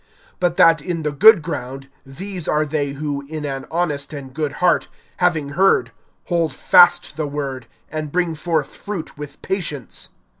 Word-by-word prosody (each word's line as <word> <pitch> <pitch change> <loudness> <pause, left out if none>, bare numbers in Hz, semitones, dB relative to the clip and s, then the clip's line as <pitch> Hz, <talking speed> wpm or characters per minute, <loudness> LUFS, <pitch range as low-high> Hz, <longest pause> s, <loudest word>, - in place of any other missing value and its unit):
(15)But 175 -2 +1
that 165 -2 +5
in 165 0 -3
the 150 - -1
good 200 +3 +7
ground, 135 -4 -5 0.2
these 180 +5 -7
are 150 0 +2
they 145 -2 -2
who, 145 0 -3
in 155 0 -5
an 135 -1 -5
honest 155 -4 -2
and 135 -3 -8
good 150 -1 -2
heart, 180 +2 +2 0.3
having 165 -5 +1
heard, 190 +7 +2 0.3
hold 165 -5 0
fast 175 -3 +5
the 155 -2 -1
word, 135 -4 -5 0.2
and 155 -1 -4
bring 175 -1 0
forth 160 -2 -2
fruit 195 -6 -6
with 145 -1 -9
patience. 155 - -4
155 Hz, 160 wpm, -20 LUFS, 140-175 Hz, 0.3 s, good